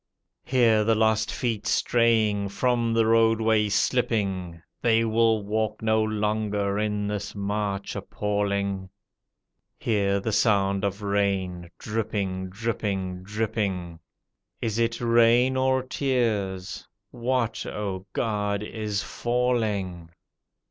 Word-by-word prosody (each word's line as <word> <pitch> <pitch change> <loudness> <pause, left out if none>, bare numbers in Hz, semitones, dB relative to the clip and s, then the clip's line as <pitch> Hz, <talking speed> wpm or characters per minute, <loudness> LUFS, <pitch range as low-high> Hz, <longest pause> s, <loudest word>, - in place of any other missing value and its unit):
Hear 115 -4 +3
the 110 +1 +3
lost 110 0 +2
feet 110 -5 -2
straying, 110 -4 +2
from 120 +2 +1
the 115 -1 +3
roadway 110 -1 +3
slipping. 100 -7 0 0.2
They 115 -1 +3
will 110 -1 +2
walk 110 +1 -2
no 110 0 +3
longer 105 -1 -1
in 105 -1 -1
this 105 0 -4
march 100 -1 -2
appalling; 100 -2 -2 0.9
Hear 100 -3 +1
the 110 +3 -2
sound 100 -2 +2
of 100 +1 -2
rain 95 -3 -1
dripping, 100 -4 -3
dripping, 95 -3 -3
dripping. 100 -4 -3 0.6
Is 110 0 -2
it 115 0 0
rain 120 +2 +4
or 130 0 +2
tears? 110 -9 -1 0.2
What, 120 -1 -1
O 100 -2 -4
God, 105 -3 -1
is 105 -2 -3
falling? 110 -8 -1
105 Hz, 105 wpm, -26 LUFS, 100-115 Hz, 0.9 s, rain